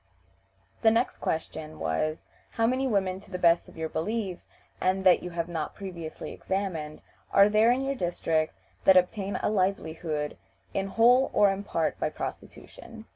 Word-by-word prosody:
The 220 - +6
next 230 +3 +1
question 160 -1 -4
was, 80 - -1 0.3
"How 225 - +1
many 260 +3 +1
women, 190 -5 0
to 195 - -16
the 185 - -4
best 170 -1 +3
of - - -16
your 160 0 -2
belief, 190 +3 -3 0.4
and 190 +1 +1
that 185 -2 +6
you 180 - -5
have 170 -1 -3
not 165 -3 -4
previously 175 -5 -7
examined, 175 -6 -3 0.3
are 200 +1 +6
there 215 +2 +4
in 255 +2 +2
your 275 +1 0
district 165 -7 -1 0.3
that 190 -1 +8
obtain 195 +2 +1
a - - +2
livelihood 160 -6 -1 0.4
in 195 0 -1
whole 245 +6 +4
or 205 -1 +5
in 195 +1 -4
part - - -1
by - - 0
prostitution?" 225 -1 -8
190 Hz, 165 wpm, -28 LUFS, 165-215 Hz, 0.4 s, that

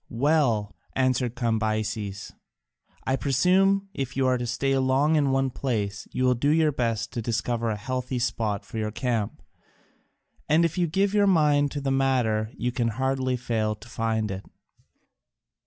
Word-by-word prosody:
"Well," 120 -5 +1 0.2
answered 130 -2 +1
Cambyses, 110 -3 -2 0.7
"I 130 - +1
presume 190 +9 +2
if 135 -8 -4
you 135 - +2
are 130 -1 +2
to 120 - -3
stay 135 +3 0
long 135 +4 +2
in 145 -3 +2
one 135 0 +1
place 105 -7 -3
you 130 - -1
will 125 0 +4
do 125 +4 0
your 155 0 +3
best 115 -3 -2
to 120 - -2
discover 115 +1 -1
a 105 - -2
healthy 130 +3 -3
spot 110 -4 -1
for 110 - -6
your 110 -1 -1
camp, 110 - -2 1.1
and 160 +3 +4
if 165 - -1
you 175 -1 +1
give 195 +5 +1
your 205 -1 +4
mind 150 -5 +3
to 145 - -3
the 135 -1 -1
matter 125 -5 +1
you 125 - -1
can 120 -1 0
hardly 130 +2 0
fail 110 -3 -1
to 105 - -15
find 110 -2 -1
it. 95 +1 -5
125 Hz, 165 wpm, -26 LUFS, 110-140 Hz, 1.1 s, will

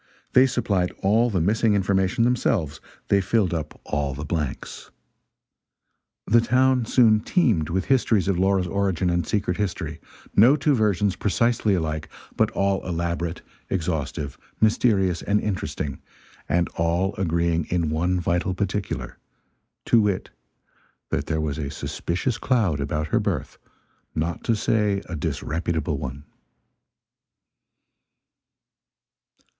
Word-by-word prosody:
They 130 +1 +6
supplied 100 -8 0
all 110 +5 +3
the 95 -5 0
missing 105 +5 +2
information 95 +2 +1
themselves, 105 - 0 0.3
they 100 -1 +4
filled 95 -2 +1
up 80 -3 -4
all 70 -2 -2
the 75 +3 -5
blanks. 75 -3 -4 1.4
The 115 +2 +4
town 130 +1 +3
soon 110 -4 +5
teemed 110 - +1
with 95 +3 -1
histories 115 -7 +2
of 95 -3 +1
Laura's 95 -1 +2
origin 95 -1 0
and 85 -1 0
secret 100 -4 -1
history, 85 -6 -3 0.4
no 120 +8 +7
two 150 0 +2
versions 105 -4 +1
precisely 110 -1 +1
alike, 80 -2 -3 0.3
but - - +2
all 100 0 0
elaborate, 85 -1 -3 0.3
exhaustive, 80 -5 -3 0.2
mysterious 100 -5 +2
and 105 +1 +1
interesting, 90 -9 -3 0.5
and 85 0 +2
all 85 +4 0
agreeing 85 -2 +1
in 85 -3 -1
one 90 +4 +1
vital 90 +2 0
particular 100 +1 -3 0.7
to 115 - +5
wit, 100 -3 -1 0.8
that 70 - -1
there 80 -1 -1
was 75 -1 -2
a 70 -3 -3
suspicious 90 - -3
cloud 110 - +1
about 75 +2 -2
her - - +2
birth, - - -3 0.6
not 80 +1 -2
to 115 - +2
say 105 -2 +1
a 90 - -5
disreputable 80 +1 -2
one. 65 +2 -6
95 Hz, 125 wpm, -24 LUFS, 80-105 Hz, 1.4 s, no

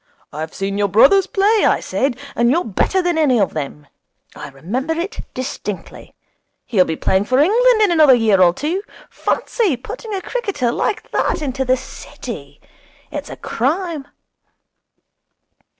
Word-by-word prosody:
"I've 155 +2 -5
seen 195 +1 -3
your 205 - +2
brothers 275 - +5
play," 410 +2 +2
I - - +3
said, 270 -2 -1 0.2
"and 235 0 +3
you're 330 +7 +2
better 360 - 0
than 350 -2 0
any 265 -6 +3
of 195 - +1
them." 150 -1 -5 0.5
I 145 - -8
remember 215 - -3
it 360 +7 -4 0.2
distinctly. 255 -7 -6 0.5
He'll 195 -7 +3
be 160 - -2
playing 190 +5 +1
for 255 +4 +1
England 445 - +4
in 405 - +3
another 305 -6 +6
year 215 -5 +3
or 175 -1 +6
two. 305 - -2 0.3
Fancy 395 - 0
putting 430 - -7
a 380 - -3
cricketer 400 - -2
like 420 - -2
that - - 0
into 265 -1 -2
the 255 0 +2
City! 265 +2 -9 0.5
It's - - -5
a - - -8
crime.' 305 +3 -2
270 Hz, 150 wpm, -19 LUFS, -, 0.5 s, another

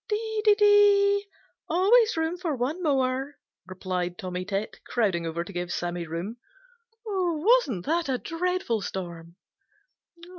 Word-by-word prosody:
"Dee, 440 0 -2
dee, 420 -1 +6
dee! 410 -1 +5 0.4
Always 425 +6 +4
room 320 +2 0
for 345 -5 -3
one 270 +8 -2
more," 270 -2 0 0.3
replied 180 -1 -4
Tommy 180 -1 -4
Tit, 200 +2 -4
crowding 190 -8 0
over 165 +1 -3
to - - -11
give 175 0 -4
Sammy 175 -1 -3
room. 175 +8 -5 0.7
"Wasn't 360 - +1
that 330 -1 0
a 260 - +1
dreadful 335 - -2
storm?" 170 -3 -6
275 Hz, 125 wpm, -26 LUFS, -, 0.7 s, dee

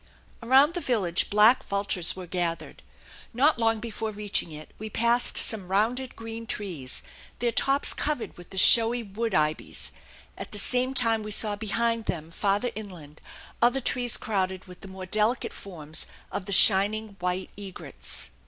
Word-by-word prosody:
Around 265 +7 +4
the 350 - -3
village 190 - 0
black 215 +5 +5
vultures 200 -3 0
were 185 -1 -8
gathered. 175 -1 -4 0.5
Not 275 +2 +3
long 225 -1 +1
before 225 0 -5
reaching 205 -5 -3
it 155 0 -10
we 215 +1 -6
passed 235 +3 +1
some 205 -5 +2
rounded 230 +7 -1
green 225 0 -8
trees, 170 - -4 0.3
their 240 0 -1
tops 275 +4 +2
covered 295 -5 -3
with 175 - -14
the 190 - -10
showy 230 +4 +7
wood 220 +3 -4
ibis; 155 0 -1 0.5
at - - -8
the - - -3
same 255 +5 0
time 230 -3 +2
we 215 - -7
saw 210 0 +2
behind 230 +2 -1
them, 160 -1 -5
farther 205 +6 0
inland, 175 -9 -10 0.4
other 245 +3 +3
trees 245 -2 0
crowded 190 -3 -3
with 180 -1 -14
the - - -10
more 190 0 -9
delicate 215 +6 0
forms 155 -5 -5 0.2
of 190 - -5
the - - -5
shining 210 +3 +5
white 180 +1 -3
egrets. 195 -2 -8
210 Hz, 160 wpm, -26 LUFS, 185-235 Hz, 0.5 s, showy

